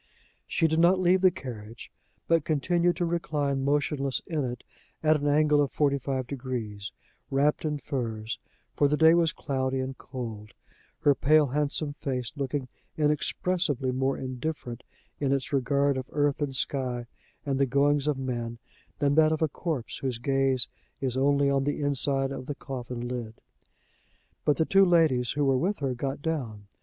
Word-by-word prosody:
She 165 - +2
did 160 +1 +1
not 175 +3 +5
leave 185 +1 +4
the 185 - +7
carriage, 115 -7 -9 0.4
but 165 -2 +3
continued 170 +4 +1
to 175 0 0
recline 145 -5 -1
motionless 140 -1 0
in 155 -4 -1
it, 125 -1 -4 0.4
at 155 -1 +4
an 145 - 0
angle 150 0 +4
of 140 - 0
forty 140 -2 +1
five 130 -1 -2
degrees, 120 -6 -5 0.4
wrapped 145 +3 +1
in 150 -1 0
furs, 115 -5 -4 0.4
for 145 - +4
the 150 +1 +1
day 160 +1 +7
was 170 -2 +3
cloudy 130 -1 -2
and 130 0 -3
cold, 110 -7 -7 0.5
her 145 -2 +5
pale 150 +3 +4
handsome 145 +1 -1
face 130 -4 -3
looking 140 -1 -2 0.3
inexpressibly 150 -2 0
more 130 +1 0
indifferent 130 -1 -4 0.4
in 140 -2 0
its 140 0 -1
regard 140 +1 +2
of 130 0 -5
earth 145 0 +1
and 140 -2 -1
sky 125 -2 -1 0.4
and 135 -2 0
the 140 - +3
goings 140 +2 +2
of 150 -2 +1
men, 120 -3 -3 0.4
than 140 -1 +2
that 155 +1 +5
of 160 0 0
a - - +4
corpse 150 -4 -4
whose 130 -3 -2
gaze 135 0 +1 0.3
is 130 -2 -2
only 140 +1 +3
on 140 -1 +2
the 145 +1 -1
inside 135 -1 +1
of 130 -1 -6
the 145 - -3
coffin 125 -3 -5
lid. 120 -3 -5 1.1
But 150 - +3
the 160 - +2
two 195 +3 +5
ladies 160 -9 +3
who 145 0 +1
were 135 -1 +3
with 195 +7 0
her 135 -3 -1
got 135 +3 -4
down. 120 -11 -3
140 Hz, 170 wpm, -28 LUFS, 130-150 Hz, 1.1 s, the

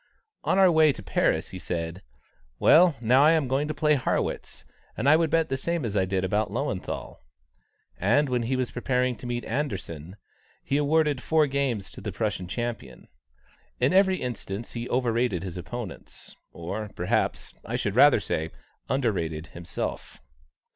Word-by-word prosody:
On - - +1
our 190 -2 +6
way 160 -2 +5
to 100 - -10
Paris, 85 - 0
he 95 - -8
said: 85 +1 -4 0.6
"Well, 170 - +6
now 125 +4 +5
I 155 +2 +6
am 155 -5 +1
going 135 +3 0
to 155 - -2
play 150 0 +3
Harrwitz, 95 - -2 0.3
and 125 - -1
I 150 - +7
would 165 0 +2
bet 165 +1 +2
the 135 - -1
same 170 0 -2
as 105 -3 -3
I 95 -2 +2
did 95 0 -1
about 105 +3 0
Löwenthal;" - - -4 0.8
and 125 +10 +3
when 125 -2 0
he 120 +3 -1
was 130 -1 -1
preparing 125 0 0
to 125 - -8
meet 120 0 -3
Anderssen, 95 - -4 0.5
he 140 - 0
awarded 150 -2 +2
four 160 +2 +3
games 135 -8 -2
to - - -9
the 105 - -4
Prussian 95 -2 -2
champion. 115 - -5 0.7
In 130 +7 +2
every 190 0 +4
instance 115 -3 -5
he 120 0 -5
overrated 120 -6 0
his 90 -3 -6
opponents, 105 +2 -8 0.2
or, 105 +5 -5
perhaps - - -1
I - - -4
should - - -2
rather - - +7
say, 80 +1 -2 0.4
underrated 90 - -1
himself. 85 0 -5
120 Hz, 165 wpm, -26 LUFS, 95-145 Hz, 0.8 s, I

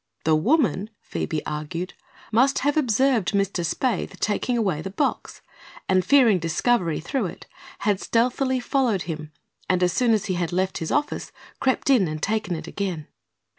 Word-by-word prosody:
The 160 0 +3
woman, 220 - +2
Phoebe 155 -2 -3
argued, 160 +4 -4 0.4
must 260 +5 +3
have 290 - +2
observed 255 - +2
Mr. 200 -3 0
Spaythe 225 +5 -1
taking 240 +4 0
away 190 -9 0
the 195 - -5
box 275 +9 -2 0.5
and, 185 -1 +3
fearing 240 -8 +5
discovery 170 +1 +1
through 225 - -2
it, - - -10 0.4
had 205 -2 +1
stealthily 255 +3 +1
followed 245 - +1
him 155 -2 -6 0.4
and 185 -1 +2
as 180 -1 +2
soon 240 +1 +3
as 215 -1 +1
he 190 - -1
had 175 -2 -2
left 185 +1 -1
his 160 - -3
office 295 0 -1 0.3
crept 265 +4 0
in 225 -9 +4
and 155 0 -4
taken 215 -4 0
it 160 - -6
again. 180 -7 -4
200 Hz, 165 wpm, -24 LUFS, 175-250 Hz, 0.5 s, fearing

